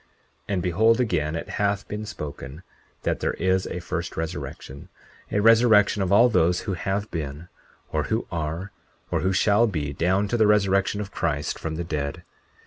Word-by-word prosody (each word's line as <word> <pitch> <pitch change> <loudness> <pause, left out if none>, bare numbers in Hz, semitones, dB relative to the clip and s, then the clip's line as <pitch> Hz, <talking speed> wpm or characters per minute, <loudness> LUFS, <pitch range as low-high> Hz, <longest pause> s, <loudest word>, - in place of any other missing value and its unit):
40:16 - - -36 0.5
And 90 - 0
behold, 110 +6 +3
again 80 -10 0
it 80 - -4
hath 100 0 -1
been 105 +1 -5
spoken, 75 -4 -7 0.4
that - - 0
there - - -1
is 95 +1 +1
a - - -4
first 85 0 -4
resurrection, 80 -3 -6 0.4
a 105 - +1
resurrection 110 -2 +5
of 95 - 0
all 115 +5 +7
those 90 -6 +2
who 100 - -3
have 95 +4 -2
been, 80 +1 -5 0.4
or - - 0
who - - -1
are, 85 +4 -3 0.4
or - - +1
who 95 - +1
shall 105 +4 +3
be, 75 -8 -3
down 95 +7 +1
to 120 - +1
the 110 -2 +4
resurrection 100 0 +2
of 100 - -7
Christ 75 0 -2
from 80 -1 -4
the 85 - -3
dead. 75 -4 -4
95 Hz, 180 wpm, -25 LUFS, 80-105 Hz, 0.5 s, all